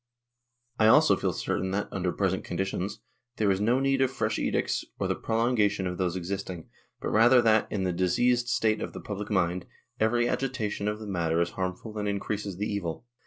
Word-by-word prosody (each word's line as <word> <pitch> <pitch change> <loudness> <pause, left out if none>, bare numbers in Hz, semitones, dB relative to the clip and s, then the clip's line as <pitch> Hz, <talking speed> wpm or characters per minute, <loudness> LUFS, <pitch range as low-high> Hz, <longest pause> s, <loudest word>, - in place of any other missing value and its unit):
"I 110 - +5
also 110 - +6
feel - - -1
certain 95 - -2
that, 100 +1 -1
under 90 -2 -1
present 95 -1 0
conditions, 95 +3 -3 0.3
there 105 -4 +2
is 95 +1 0
no 120 +5 +3
need 135 0 +2
of 135 - +3
fresh - - -1
edicts - - 0
or - - -1
the - - +1
prolongation 110 -4 +1
of 90 0 -3
those 90 -1 0
existing, 95 -1 -5 0.3
but - - -3
rather 120 +4 +6
that, 110 -1 +3
in 100 -3 -1
the 90 -1 0
diseased 120 +8 +2
state 110 -2 +1
of - - -4
the - - -6
public 105 0 -5
mind, 90 -3 0 0.3
every 120 +2 +2
agitation 120 -6 -2
of 105 0 -1
the 110 - -8
matter 85 -4 0
is 85 0 +1
harmful 95 +4 -4
and 105 - -2
increases 100 -1 -3
the 105 - -1
evil. 100 -2 -3
100 Hz, 195 wpm, -28 LUFS, 95-110 Hz, 0.3 s, also